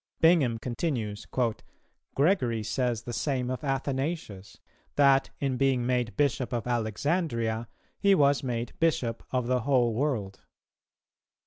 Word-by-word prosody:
Bingham 160 Hz, -9 st, +4 dB
continues 115 Hz, -4 st, -3 dB, 0.9 s
"[Gregory] 130 Hz, -, +2 dB
says 120 Hz, +1 st, -1 dB
the 120 Hz, -, -6 dB
same 130 Hz, -1 st, -1 dB
of 130 Hz, -, -4 dB
Athanasius; 135 Hz, -, -3 dB, 0.4 s
that, 140 Hz, -1 st, +4 dB
in 135 Hz, -2 st, -1 dB
being 130 Hz, -3 st, +2 dB
made 125 Hz, -4 st, -1 dB
Bishop 130 Hz, -4 st, +1 dB
of 120 Hz, -3 st, -2 dB
Alexandria, 115 Hz, -, -1 dB, 0.3 s
he 200 Hz, -1 st, +5 dB
was 140 Hz, -3 st, +3 dB
made 120 Hz, -2 st, -3 dB
Bishop 150 Hz, -8 st, +1 dB
of 125 Hz, -2 st, -1 dB
the 125 Hz, +1 st, +1 dB
whole 125 Hz, -2 st, +2 dB
world. 110 Hz, -7 st, -2 dB
125 Hz, 120 wpm, -28 LUFS, 115-140 Hz, 0.9 s, he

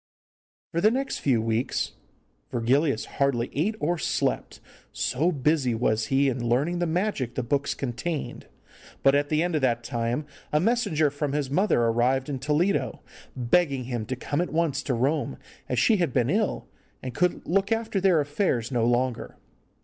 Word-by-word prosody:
For 170 Hz, -, -1 dB
the 215 Hz, -, +6 dB
next 265 Hz, +4 st, -2 dB
few 120 Hz, -6 st, +2 dB
weeks 115 Hz, +2 st, -1 dB, 0.6 s
Virgilius 125 Hz, +1 st, +1 dB
hardly 130 Hz, -4 st, 0 dB
ate 185 Hz, +10 st, 0 dB
or 170 Hz, +1 st, 0 dB
slept, -, -, -1 dB, 0.3 s
so 155 Hz, +8 st, 0 dB
busy 140 Hz, -4 st, +1 dB
was 110 Hz, -1 st, 0 dB
he 140 Hz, +1 st, +3 dB
in 120 Hz, -2 st, -1 dB
learning 150 Hz, +9 st, +1 dB
the 175 Hz, -, 0 dB
magic 165 Hz, -, -1 dB
the 130 Hz, -, -1 dB
books 140 Hz, +4 st, 0 dB
contained. 140 Hz, +5 st, -4 dB, 0.6 s
But 135 Hz, -, +6 dB
at 145 Hz, 0 st, +1 dB
the 155 Hz, +1 st, +2 dB
end 175 Hz, 0 st, -1 dB
of 155 Hz, -, +1 dB
that 120 Hz, -3 st, +1 dB
time 120 Hz, +3 st, -2 dB, 0.3 s
a 150 Hz, -, +3 dB
messenger 185 Hz, -, +2 dB
from 145 Hz, 0 st, -3 dB
his 145 Hz, -3 st, -1 dB
mother 185 Hz, -, +2 dB
arrived 125 Hz, +4 st, +1 dB
in 135 Hz, -2 st, -3 dB
Toledo, 150 Hz, +8 st, 0 dB, 0.3 s
begging 135 Hz, +2 st, +1 dB
him 120 Hz, -3 st, -4 dB
to 130 Hz, -, -2 dB
come 145 Hz, +5 st, -2 dB
at 175 Hz, -, -2 dB
once 155 Hz, -4 st, 0 dB
to 135 Hz, -3 st, -1 dB
Rome, 135 Hz, -, 0 dB, 0.3 s
as 125 Hz, -, -1 dB
she 215 Hz, -, +4 dB
had 170 Hz, -8 st, 0 dB
been 125 Hz, 0 st, +2 dB
ill, 210 Hz, +2 st, 0 dB, 0.4 s
and 130 Hz, -1 st, -5 dB
could 180 Hz, +7 st, 0 dB
look 195 Hz, +4 st, +1 dB
after 225 Hz, -3 st, 0 dB
their 185 Hz, -4 st, +4 dB
affairs 145 Hz, -, 0 dB
no 120 Hz, -2 st, +1 dB
longer. 120 Hz, 0 st, -1 dB
140 Hz, 170 wpm, -26 LUFS, 125-170 Hz, 0.6 s, the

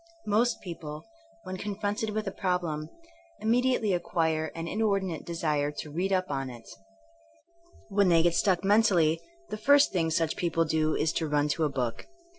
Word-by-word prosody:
Most 225 Hz, +3 st, +1 dB
people, 155 Hz, -4 st, -7 dB, 0.4 s
when 185 Hz, 0 st, -6 dB
confronted 205 Hz, +2 st, -2 dB
with 215 Hz, +1 st, -2 dB
a 195 Hz, -, -3 dB
problem, 175 Hz, -6 st, -2 dB, 0.5 s
immediately 230 Hz, -2 st, +2 dB
acquire 160 Hz, -3 st, 0 dB
an 165 Hz, 0 st, -4 dB
inordinate 195 Hz, -5 st, -1 dB
desire 155 Hz, -4 st, 0 dB
to 150 Hz, -, -7 dB
read 180 Hz, +6 st, -1 dB
up*^ 185 Hz, -3 st, 0 dB
on 135 Hz, -1 st, -2 dB
it. 120 Hz, -2 st, -11 dB, 1.2 s
When 200 Hz, -2 st, +3 dB
they 165 Hz, -1 st, +5 dB
get 170 Hz, -1 st, +3 dB
stuck 185 Hz, 0 st, +2 dB
men 205 Hz, +3 st, +5 dB
tally, 165 Hz, -6 st, +2 dB, 0.3 s
the 215 Hz, -, -4 dB
first 285 Hz, +6 st, +5 dB
thing 165 Hz, -3 st, 0 dB
such 160 Hz, 0 st, 0 dB
people 165 Hz, -1 st, +1 dB
do 155 Hz, 0 st, +1 dB
is 155 Hz, +1 st, 0 dB
to 160 Hz, -, -1 dB
run 150 Hz, 0 st, +1 dB
to 160 Hz, +2 st, +1 dB
a -, -, +1 dB
book. 125 Hz, -4 st, -3 dB
175 Hz, 170 wpm, -28 LUFS, 155-205 Hz, 1.2 s, they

